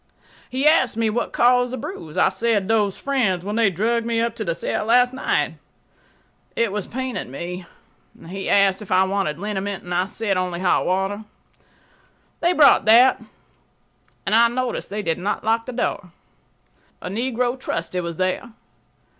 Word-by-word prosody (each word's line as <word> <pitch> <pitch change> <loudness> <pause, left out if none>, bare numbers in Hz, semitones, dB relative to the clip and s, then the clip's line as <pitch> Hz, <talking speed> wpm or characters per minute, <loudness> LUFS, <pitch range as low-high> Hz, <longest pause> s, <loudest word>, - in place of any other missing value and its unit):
He 260 +3 -2
asked 280 -7 +4
me 225 -1 +1
what 240 - -2
caused' 245 0 +3
the - - -3
bruise. 160 -9 -8
I - - +4
said, 225 -4 0
"Those 210 -3 +1
fiends 220 -11 0
when 205 +1 -3
they 225 -3 +3
dragged 225 +6 0
me 230 0 0
to 230 -1 -5
the 170 -4 -2
cell 210 - -3
last 245 +2 +4
night." 265 - -1 1.0
It 230 -3 +1
was 205 -1 -3
paining 260 - -4
me. 175 +6 -6 0.6
He 195 +2 -5
asked 200 0 +3
if 210 - -10
I 185 - +5
wanted 190 -6 -1
liniment 200 0 -4
and 180 - -5
I 180 +1 +1
said 200 -1 -2
only 180 -1 -2
hot 180 -1 +1
water. 195 +3 -1 1.2
They 345 - +2
brought 295 - +5
that, 235 +4 +6 1.0
and - - -1
I 230 +1 +6
noticed 250 +1 -3
they 205 +1 -4
did 165 -1 -1
not 200 +3 -2
lock 225 +2 0
the - - -4
door. 230 -6 -3 0.9
A - - -7
negro 240 +4 -1
trusty 170 -4 -3
was 170 -1 -5
there. 185 +5 -2
210 Hz, 165 wpm, -22 LUFS, 185-235 Hz, 1.2 s, that